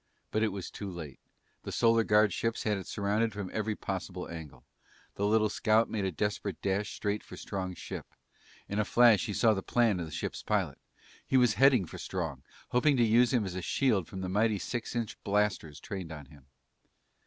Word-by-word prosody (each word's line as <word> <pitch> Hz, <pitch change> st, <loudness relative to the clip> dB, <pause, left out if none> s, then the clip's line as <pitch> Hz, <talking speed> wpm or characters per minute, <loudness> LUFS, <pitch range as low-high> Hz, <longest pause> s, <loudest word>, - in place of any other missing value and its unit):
But 110 Hz, -, +1 dB
it 110 Hz, -, +3 dB
was 100 Hz, -3 st, -5 dB
too 100 Hz, -, -6 dB
late. 80 Hz, -6 st, -8 dB, 0.4 s
The -, -, -6 dB
Solar 115 Hz, -1 st, +4 dB
Guard 105 Hz, -1 st, +4 dB
ships 115 Hz, 0 st, -1 dB
had 105 Hz, -1 st, +1 dB
it 95 Hz, -, -9 dB
surrounded 105 Hz, +2 st, 0 dB
from 100 Hz, -2 st, -5 dB
every 110 Hz, 0 st, -1 dB
possible 95 Hz, -2 st, -5 dB
angle. 75 Hz, -6 st, -9 dB, 0.5 s
The 100 Hz, -, 0 dB
little 110 Hz, 0 st, +4 dB
scout 110 Hz, +2 st, +2 dB
made 105 Hz, -3 st, -1 dB
a 95 Hz, -, 0 dB
desperate 105 Hz, +2 st, -2 dB
dash 100 Hz, +1 st, -1 dB
straight 105 Hz, 0 st, -1 dB
for -, -, -11 dB
Strong's 95 Hz, -2 st, -4 dB
ship. -, -, -7 dB, 0.6 s
In 100 Hz, -, -2 dB
a -, -, +3 dB
flash, 120 Hz, 0 st, +5 dB
he 105 Hz, -, -3 dB
saw 115 Hz, -2 st, +4 dB
the 95 Hz, -, -2 dB
plan 115 Hz, -3 st, +2 dB
of 85 Hz, -, -4 dB
the -, -, -10 dB
ship's -, -, -4 dB
pilot. -, -, -1 dB, 0.5 s
He 135 Hz, -, +3 dB
was 125 Hz, -4 st, +5 dB
heading 130 Hz, -6 st, +5 dB
for -, -, -9 dB
Strong, 65 Hz, -1 st, -4 dB, 0.3 s
hoping 135 Hz, +3 st, +3 dB
to 120 Hz, -, +4 dB
use 115 Hz, +2 st, +4 dB
him 120 Hz, -5 st, +2 dB
as 95 Hz, -, -4 dB
a 95 Hz, -, -4 dB
shield 105 Hz, -, +1 dB
from 95 Hz, -, -7 dB
the 95 Hz, -, -3 dB
mighty 105 Hz, +3 st, +2 dB
six 120 Hz, +4 st, -4 dB
inch 115 Hz, -3 st, -3 dB
blasters 100 Hz, -7 st, 0 dB
trained 95 Hz, -6 st, -6 dB
on 75 Hz, -3 st, -8 dB
him. 70 Hz, -1 st, -18 dB
105 Hz, 205 wpm, -30 LUFS, 95-115 Hz, 0.6 s, flash